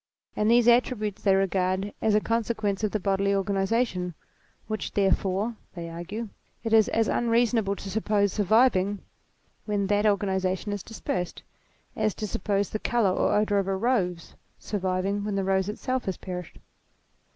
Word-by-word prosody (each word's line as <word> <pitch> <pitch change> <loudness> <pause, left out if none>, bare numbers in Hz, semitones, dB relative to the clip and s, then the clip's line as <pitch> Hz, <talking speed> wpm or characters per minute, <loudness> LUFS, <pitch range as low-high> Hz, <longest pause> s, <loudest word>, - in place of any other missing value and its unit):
and 210 +1 +1
these 235 0 +5
attributes 235 -4 +2
they 195 -2 +4
regard 190 +1 0
as 220 -1 +3
a - - +5
consequence 220 -2 -1
of 215 - +2
the 215 - -2
bodily 195 +1 +1
organization, 195 -2 0 0.5
which 215 0 -4
therefore, 200 +2 +1 0.2
they 170 -1 -5
argue, 185 +7 -5 0.4
it 225 -1 -1
is 220 -2 +5
as 225 -1 +1
unreasonable 230 -3 +2
to 200 - -9
suppose 205 0 +1
surviving 205 -2 +3 0.6
when 205 -2 0
that 205 +2 +2
organization 190 -1 0
is 205 - -4
dispersed, 180 -5 -4 0.5
as 215 - 0
to 215 - -4
suppose 200 0 -1
the 215 - -2
colour 230 -5 +2
or - - +1
odour 210 -1 +2
of 195 - -2
a 195 - 0
rose 190 -7 -1 0.2
surviving 195 0 -2
when 205 -1 -2
the 195 - 0
rose 190 0 +1
itself 255 +4 -2
has 190 -3 -2
perished. 180 -2 -7
205 Hz, 155 wpm, -26 LUFS, 190-220 Hz, 0.6 s, these